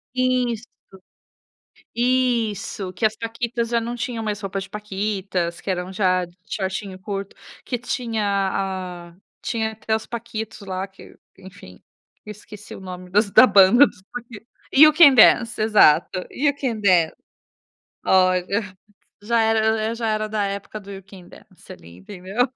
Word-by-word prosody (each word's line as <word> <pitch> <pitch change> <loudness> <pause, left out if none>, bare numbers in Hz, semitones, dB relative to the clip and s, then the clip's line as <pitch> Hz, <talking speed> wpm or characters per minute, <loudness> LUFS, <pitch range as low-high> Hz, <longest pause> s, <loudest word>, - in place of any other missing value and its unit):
Isso, 250 -3 0 1.3
isso, 235 -6 -1
que 180 +5 -1
as 215 0 +1
Paquitas 230 +1 -3
já 235 -1 +1
não 240 +1 -4
tinham 240 -2 -4
mais 210 -1 -3
roupas 195 -1 -4
de 195 - -13
paquitas, 195 -4 -3
que - - -7
eram 180 0 -3
já 185 -2 +1 0.2
shortinho 190 0 -4
curto, 195 0 -6 0.3
que 245 - -2
tinha 235 -2 -3 0.3
a 180 -3 -5 0.3
tinha 220 -2 -2
até 220 0 -4
os 220 - -4
Paquitos 225 -2 -7
lá 190 -1 -5
que, 195 0 -17 0.2
enfim, 180 - -14 0.4
esqueci 210 0 -11
o - - -10
nome 185 -1 -9
das 205 +3 +2
da 255 - +8
banda 205 +8 +7
dos 185 - -9
Paquitos. 235 -2 -10 0.3
You 305 +2 +8
Can 300 -3 +8
Dance. 230 -1 +5
Exato, 185 -4 +3
You 285 +1 +1
Can 240 -5 -2
Dance. 180 -6 +3 0.9
Olha, 185 +2 +2 0.6
já 230 +2 +1
era 220 0 +1
já 230 -1 -3
era 215 0 -1
da 210 -1 -1
época 200 +2 -6
do 200 0 -13
You 195 -1 -8
Can 185 -2 -15
Dance - - -18
ali, 85 +1 -14
entendeu? 195 - -3
210 Hz, 145 wpm, -22 LUFS, 190-230 Hz, 1.3 s, da